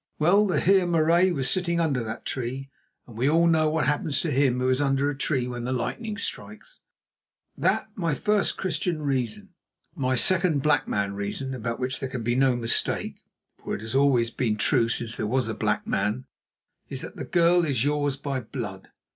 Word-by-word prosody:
Well, 195 +7 +4
the 185 - +1
Heer 190 -1 +3
Marais 170 +2 +3
was 135 -6 -1
sitting 170 +3 0
under 140 -7 0
that 110 -1 -6
tree, 130 +2 -4 0.3
and 120 - -14
we 125 +5 +1
all 165 +2 +4
know 160 -2 +3
what 160 +1 0
happens 145 -1 0
to 165 - -2
him 130 -2 +2
who 130 - 0
is 130 +2 +2
under 140 0 +1
a - - -6
tree 135 -2 -1
when 120 -1 -5
the 125 - -3
lightning 210 - -3
strikes - - -7 0.8
it. - - -15
That - - +1
my 165 -6 -1
first 210 +8 0
Christian 170 -3 -2
reason. 130 -6 -2 0.4
My 130 -1 0
second 170 0 +2
black 145 -3 +2
man 100 -1 -1
reason, 100 +7 -4
about 115 -1 -4
which 130 0 -2
there 135 - -4
can 130 -3 -5
be 120 +2 0
no 130 0 +3
mistake, 115 -1 0 0.4
for - - -3
it - - -7
has 110 +2 -5
always 135 -4 +3
been 115 -3 -1
true 115 +2 +2
since 120 0 -1
there - - -2
was 125 +1 0
a 110 - -2
black - - -1
man, 115 +5 -1 0.6
is - - -3
that - - -8
the - - -5
girl 175 0 +3
is 135 -7 0
yours 145 -2 0
by 140 -1 -3
blood. 110 -5 -7
135 Hz, 200 wpm, -25 LUFS, 120-160 Hz, 0.8 s, Well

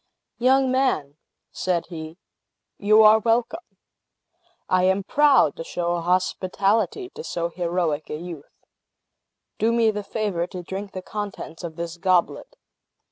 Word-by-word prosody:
"Young 260 +1 +3
man," 250 - 0 0.3
said 180 -2 -1
he, 160 -1 -8 0.6
"you 215 +2 +5
are 215 +1 +7
welcome! 235 - -1 0.9
I 185 0 +2
am 190 +1 +2
proud 280 - +4
to - - -5
show 175 0 -2
hospitality 185 - 0
to 465 - -9
so 170 - -3
heroic 170 -3 -2
a - - -3
youth. 165 -3 -10 0.9
Do 225 +2 +2
me 230 -1 +3
the 210 0 -4
favor 200 -4 -2
to 180 -1 -8
drink 195 +3 -6
the 185 - -6
contents 200 -6 -6
of 165 -2 -6
this 170 0 -5
goblet. 185 - 0
185 Hz, 135 wpm, -23 LUFS, 170-220 Hz, 0.9 s, are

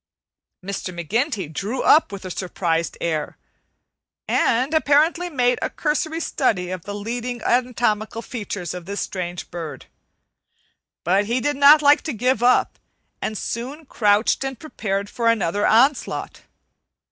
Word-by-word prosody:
Mr. 195 -1 -4
McGinty 195 - -2
drew 215 - -3
up 310 - +5
with 195 -1 -8
a 185 - -5
surprised 170 -2 -2
air, 155 -3 -2 0.9
and 255 +6 +1
apparently 315 +3 +3
made 250 -5 +1
a - - -1
cursory 315 +1 -1
study 190 - 0
of 185 -2 -6
the 205 - -5
leading 240 +4 -4
anatomical 235 -3 0
features 205 - -5
of 180 -1 -8
this 200 +1 -4
strange 175 -2 -5
bird; 165 -3 -7 1.2
but 195 +4 +2
he 235 +4 0
did 290 +4 0
not 285 +2 +7
like 290 +1 +6
to 315 - -4
give 245 +1 +1
up, 250 +1 +3 0.4
and 215 - -3
soon 265 +10 -5
crouched 210 -1 +2
and 270 -1 -4
prepared 200 -10 -3
for 230 +2 -2
another 205 -3 +2
onslaught. 260 +5 +2
230 Hz, 135 wpm, -22 LUFS, 195-270 Hz, 1.2 s, not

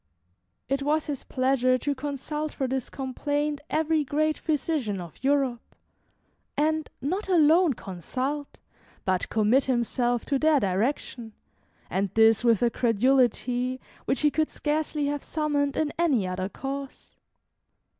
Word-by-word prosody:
It 275 +1 0
was 300 +2 +1
his 285 -3 -4
pleasure 255 -1 +2
to 285 +3 -1
consult 290 +2 -4
for 265 - -2
this 260 -1 -2
complaint 290 +2 -2
every 315 0 +1
great 305 +3 +1
physician 290 - -1
of 175 +5 -10
Europe, 270 -4 0 0.8
and 310 +1 +1
not 380 +8 -2
alone 330 -2 +5
consult, 260 - -4 0.5
but 185 -1 0
commit 225 +5 +3
himself 240 -1 0
to 275 -2 0
their 310 -1 +4
direction, 220 +3 -1 0.5
and 195 +1 -1
this 225 0 +5
with 230 -2 +3
a 235 - +3
credulity 250 +2 +2 0.3
which - - 0
he 300 -1 +4
could 310 +1 0
scarcely 300 0 -1
have 290 0 -1
summoned 290 -3 -1
in 305 -2 0
any 270 - +2
other 185 +1 -3
cause. 275 +3 -7
275 Hz, 130 wpm, -26 LUFS, 240-300 Hz, 0.8 s, alone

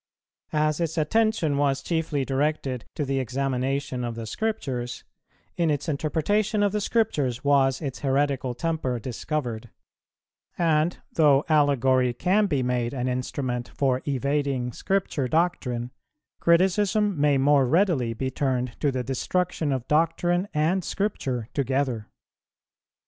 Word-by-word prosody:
As 155 0 +1
its 165 -1 -2
attention 165 -2 +1
was 140 -1 +1
chiefly 160 -5 -1
directed 135 -2 -1
to 150 - -1
the 135 0 0
examination 130 +1 -2
of 120 -1 -3
the 115 -1 -5
Scriptures, 125 - -3 0.5
in 170 -2 +2
its 145 +1 -1
interpretation 195 +8 0
of 205 - +2
the 210 +1 -1
Scriptures 145 - 0
was 135 -1 +3
its 135 -2 -4
heretical 135 -2 0
temper 155 -3 -1
discovered; 120 -1 -4 0.9
and 165 0 +2 0.2
though 145 -3 +4
allegory 130 -4 +3
can 200 - +2
be 140 -7 0
made 125 0 -1
an 125 -1 -2
instrument 125 -1 -2
for 130 -2 +1
evading 140 -2 0
Scripture 185 -8 -1
doctrine, 125 -6 0 0.5
criticism 190 +1 +2
may 145 -2 +4
more 140 -1 +4
readily 145 - +2
be 130 +3 -2
turned 130 -2 -1
to 145 - +1
the 130 -1 -2
destruction 160 +4 -1
of 130 -3 -2
doctrine 175 +4 +1
and 165 +5 +1
Scripture 135 - -2
together. 130 -5 -1
140 Hz, 125 wpm, -25 LUFS, 130-165 Hz, 0.9 s, though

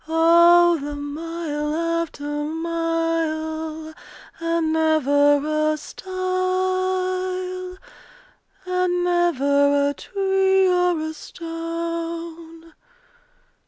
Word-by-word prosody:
Oh 340 +1 +5
the 290 +1 -5
mile 300 0 -4
after 335 -2 -2
mile, 320 0 -2 0.5
And 330 -1 0
never 305 -1 +2
a - - -4
stile! 370 +5 -9 2.5
And 365 -1 0
never 285 -5 +2
a - - -6
tree 385 +1 +1
or 360 -2 +2
a 315 0 -4
stone! 330 0 -6
330 Hz, 70 wpm, -22 LUFS, 310-335 Hz, 2.5 s, Oh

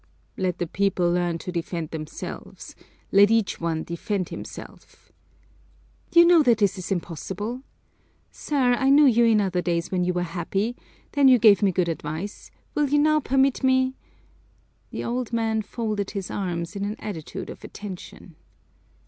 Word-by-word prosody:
"Let 185 -1 -1
the 175 - -1
people 180 0 0
learn 175 -1 0
to 180 - -6
defend 170 -2 -4
themselves, 155 0 -8 0.4
let 200 +1 +6
each 225 -5 +1
one 165 -1 -1
defend 185 +2 -3
himself!" - - -11 1.0
"You 340 0 +7
know 340 -1 +6
that 240 -6 +4
that 200 -4 +2
is 180 - -6
impossible. 195 - -4 0.7
Sir, 265 -4 +1
I 265 +2 +1
knew 290 +2 +7
you 235 -3 +5
in 225 -2 +4
other 185 -3 0
days 170 -1 -2
when 180 -1 +1
you 180 0 0
were 175 0 -1
happy; 190 +7 -2 0.4
then 285 -2 +4
you 255 -1 +7
gave 215 -3 +6
me 200 -2 +3
good 180 0 0
advice, 165 +4 -5 0.2
will 295 -2 +1
you 295 - +3
now 305 +1 +4
permit 270 -1 +1
me 260 0 +3 0.5
" - - -38
The - - -5
old 245 0 -3
man 225 -1 0
folded 210 -2 -3
his 195 -3 -5
arms 175 -2 -3
in 200 - -3
an 205 +1 -3
attitude 170 -8 -6
of - - -12
attention. 185 -4 -9
200 Hz, 165 wpm, -24 LUFS, 175-245 Hz, 1.0 s, You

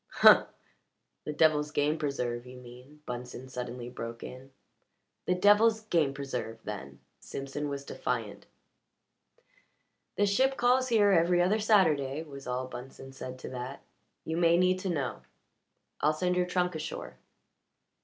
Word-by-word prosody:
"Humph! - - +9 0.8
The - - -2
devil's 150 -1 +3
game 150 +1 0
preserve, 125 -5 -2
you 125 0 -10
mean," 125 +4 -14
Bunsen 125 +1 -6
suddenly 125 -1 -6
broke 115 -1 -7
in. 130 +2 -10 0.8
"The 180 - +3
devil's 215 +4 +5
game 170 -10 +1
preserve, 125 -5 -4
then!" 70 -10 -7 0.2
Simpson 140 +2 -5
was 140 0 -5
defiant. - - -4 1.7
"The 205 - +3
ship 260 +7 +2
calls 255 +1 +3
here 215 -4 +4
every 175 0 +4
other 190 +5 +3
Saturday," 160 -9 +3
was 140 -4 -10
all 125 +1 -2
Bunsen 135 +1 -9
said 130 -1 -7
to - - -8
that. 130 +2 -6 0.4
"You 160 +1 -2
may 170 0 +4
need 185 +1 +3
to 190 - -3
know. 140 -7 -2 0.8
I'll 150 +1 +3
send 180 +3 0
your 180 0 +1
trunk 180 0 0
ashore." 155 -1 -6
150 Hz, 140 wpm, -30 LUFS, 130-180 Hz, 1.7 s, Humph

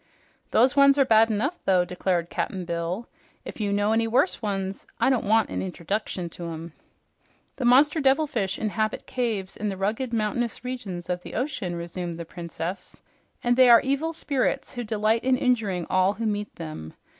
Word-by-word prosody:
"Those 250 +4 +4
ones 280 0 +6
are 275 - +5
bad 225 -1 +5
enough, 255 - -1
though," 185 -2 +3
declared 180 -1 -1
Cap'n 185 -2 -3
Bill. 170 +6 -3 0.4
"If - - -7
you 205 -1 0
know 205 +1 +1
any 225 0 +2
worse 245 +11 +2
ones, 195 -2 -3
I - - +3
don't 245 -5 0
want 220 +1 +3
a - - -4
interduction 185 0 -3
to 170 - -8
'em." 165 0 -7 0.8
"The 255 - -2
monster 295 +6 +5
devilfish 265 -8 +1
inhabit 215 0 -2
caves 220 -7 -2
in 210 - -2
the 195 - -4
rugged, 220 +6 -1
mountainous 230 +2 -1
regions 205 -9 -5
of 180 0 -2
the - - -9
ocean," 225 -9 -2
resumed 170 0 -5
the 170 - -6
Princess, 175 +2 -6 0.4
"and 245 0 +3
they 255 0 +6
are 235 -1 +8
evil 280 +5 -1
spirits 285 -5 -1
who 245 - -4
delight 220 +1 +1
in 260 0 +3
injuring 220 -9 0
all 185 +1 +3
who 230 +2 -4
meet 210 -1 -2
them. 80 0 -8
215 Hz, 180 wpm, -25 LUFS, 180-245 Hz, 0.8 s, are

